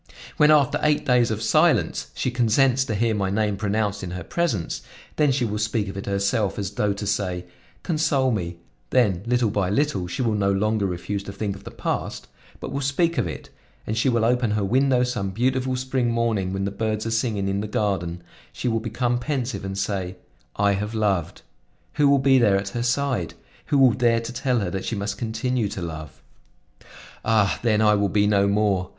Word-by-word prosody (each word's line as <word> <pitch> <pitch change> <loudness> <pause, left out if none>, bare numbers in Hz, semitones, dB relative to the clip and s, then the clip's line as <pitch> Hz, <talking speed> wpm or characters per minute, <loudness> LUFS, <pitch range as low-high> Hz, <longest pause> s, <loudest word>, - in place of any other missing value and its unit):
When, 150 - +5
after 150 -4 +4
eight 150 -1 +2
days 125 -2 +3
of 110 0 -2
silence, 110 - +2
she 130 - -1
consents 125 +2 +3
to 110 - -2
hear 115 +2 +1
my 100 -2 -1
name 105 +1 0
pronounced 105 0 -1
in 90 - -5
her 90 0 -5
presence, 115 - -2 0.4
then 150 -2 +4
she 130 -2 +1
will 105 -1 -2
speak 105 -1 -1
of 95 - -7
it 100 - -6
herself 100 +1 0
as 100 -2 -3
though 105 0 0
to 100 +1 -6
say: 95 -3 -1 0.4
'Console 150 -6 +1
me;' 85 -6 -3 0.3
then 100 - +2
little 120 -3 +2
by 100 -3 0
little 105 -5 0
she 130 +9 -3
will 115 -2 +1
no 100 -1 +1
longer 105 +1 +1
refuse 95 +3 -3
to 100 - -6
think 100 0 -3
of 100 - -14
the - - -6
past - - -4 0.3
but - - -6
will 140 - -2
speak 165 +5 +1
of 105 - 0
it, 80 - -8 0.3
and 110 - -2
she 110 +4 +2
will 115 -2 +2
open 125 0 +2
her 105 - 0
window 125 +4 +3
some 120 -6 -2
beautiful 130 +5 0
spring 130 -1 -1
morning 115 -5 0
when 95 0 -2
the 100 - -2
birds 110 +1 -2
are 115 - -2
singing 110 -4 0
in 100 +1 -1
the 105 - -4
garden; 90 -5 -2 0.3
she - - -4
will 115 -1 +1
become 120 +2 -1
pensive 130 -3 -3
and 95 0 -4
say: 95 -2 -2 0.4
'I 100 0 +3
have 105 +3 -2
loved!' 100 -7 -1 0.5
Who 145 -1 +3
will 140 - +5
be 135 -1 +4
there 105 -5 +4
at 100 0 -3
her 120 +4 -4
side? 120 -5 -1 0.3
Who 145 - +2
will 130 -3 +6
dare 120 -1 +2
to 115 +1 -6
tell 125 -2 0
her 95 -3 -2
that 95 +1 -3
she 115 - -2
must 100 0 -3
continue 115 0 -1
to 95 - -6
love? 80 -5 -8 1.0
Ah! 110 -3 +2
then 110 -2 +2
I 105 0 +5
will 100 -1 +1
be 105 +1 +2
no 100 -1 +3
more! 100 -3 +1
110 Hz, 210 wpm, -24 LUFS, 100-125 Hz, 1.0 s, will